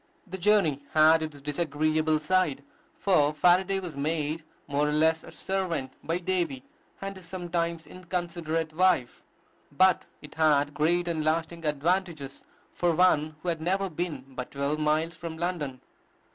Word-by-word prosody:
The 190 -1 -7
journey 175 -8 +3
had 160 +1 +6
its 155 -3 -5
disagreeable 155 +1 +1
side; 150 -3 +1 0.3
for 150 -6 +3
Faraday 180 +5 +3
was 175 -5 -7
made 155 +2 -2 0.2
more 145 +1 0
or - - 0
less 160 +1 +2
a - - -11
servant 175 -9 -2
by 165 +2 -1
Davy 175 -7 -1 0.4
and 195 0 -5
his 185 -3 -12
sometimes 170 -2 -2
inconsiderate 170 -3 -3
wife; 180 -8 +2 0.5
but 185 +6 +4 0.2
it 150 - -11
had 145 -2 +3
great 175 +4 +1
and 160 -2 -1
lasting 165 +2 -1
advantages 155 -1 -1 0.3
for 175 -1 +1
one 155 -3 +3
who 180 - -1
had 165 -2 -2
never 190 +3 0
been 155 -5 -4
but 130 -1 -6
twelve 140 +2 -2
miles 155 +2 +1
from 160 0 -7
London. 160 -7 -3
160 Hz, 145 wpm, -28 LUFS, 150-175 Hz, 0.5 s, had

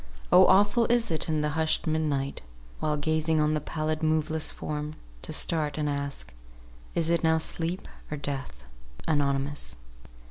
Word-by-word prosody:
O 185 +1 +8
awful 205 +5 +4
is 235 -4 +2
it 160 0 0
in 155 -1 +1
the 150 - 0
hushed 160 +1 +1
mid 160 0 +1
night, 140 -3 -2 0.4
While 150 -1 0
gazing 155 +1 +1
on 150 0 +2
the 155 - 0
pallid, 155 0 -2
moveless 155 0 +1
form, 150 0 -5 0.3
To - - -7
start 155 -3 +1
and 150 -1 0
ask, 140 - -4 0.6
'Is 165 -1 +1
it 170 - +1
now 160 0 +4
sleep 165 +3 -1 0.2
or 150 - -3
death?'" 135 - -5 0.4
ANONYMOUS. 140 - 0
155 Hz, 155 wpm, -28 LUFS, 145-160 Hz, 0.6 s, O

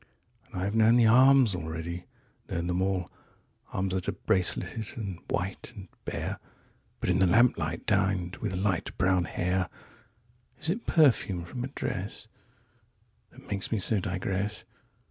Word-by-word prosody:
62And 90 - -5
I - - -1
have 100 +2 -2
known 115 +1 +5
the 120 -1 +5
arms 130 0 +6
already, 85 +1 -5 0.4
known 85 0 -2
them 90 +1 0
all 95 -2 -1 0.6
63Arms 95 +1 -1
that 95 -1 -1
are - - +1
braceleted 110 +2 -1
and 100 -6 -5
white 95 +6 -3
and 95 -4 -10 0.2
bare64(But - - -7
in 90 - +2
the 95 - +5
lamplight, 85 -7 +2
downed 95 -2 +1
with 100 -4 -3
light 95 -2 -1
brown 95 -1 +2
hair!)65Is 110 - -5
it 225 +6 -4
perfume 115 - +3
from 120 +9 -6
a - - -2
dress66That 135 - -9
makes 100 -1 -2
me 110 - +1
so 100 +2 +2
digress? 95 +2 -2
95 Hz, 140 wpm, -28 LUFS, 90-115 Hz, 0.6 s, arms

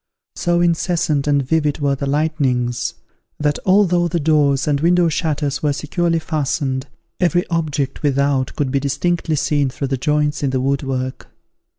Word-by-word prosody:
So 175 0 +1
incessant 170 -3 +1
and 145 -1 +2
vivid 150 +1 0
were 140 -2 +1
the 140 +1 -3
lightnings, 135 -5 0 0.4
that 150 -1 0
although 185 -3 +4
the 170 0 -1
doors 145 -3 +2
and 145 -1 +1
window 175 +1 +3
shutters 150 -3 -1
were 150 -1 +1
securely 165 +4 -1
fastened, 145 -4 -2 0.3
every 175 0 +1
object 150 -5 -2
without 140 -2 +1
could 140 -4 -1
be 140 - +1
distinctly 160 +4 -1
seen 145 -1 +1
through 135 +1 -4
the 135 - 0
joints 150 +2 0
in 140 - +1
the 130 0 0
wood 135 +2 0
work! 130 -2 -4
150 Hz, 160 wpm, -19 LUFS, 140-165 Hz, 0.4 s, although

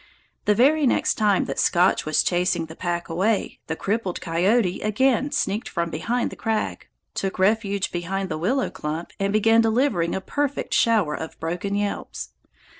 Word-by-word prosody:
The 210 - +3
very 285 +5 +4
next - - +2
time 210 -3 +2
that - - -4
Scotch 175 -2 +3
was 155 - +3
chasing 175 -1 +1
the 160 0 -11
pack 175 -1 -3
away, 195 +6 0
the 160 - -2
crippled 195 0 -2
coyote 180 +4 +1
again 260 +6 +1
sneaked 230 -6 -1
from 170 -1 -2
behind 230 +11 -1
the - - -8
crag, 225 -1 -2 0.3
took 195 -1 -3
refuge 200 0 +1
behind 190 +3 -2
the 155 - -4
willow 250 - 0
clump, 155 +3 -5
and 195 0 0
began 225 +2 +4
delivering 225 -7 +1
a - - -1
perfect 285 +7 -2
shower 215 -10 +3
of 160 - -7
broken 175 +5 -3
yelps. 205 0 -3
195 Hz, 165 wpm, -24 LUFS, 175-225 Hz, 0.3 s, very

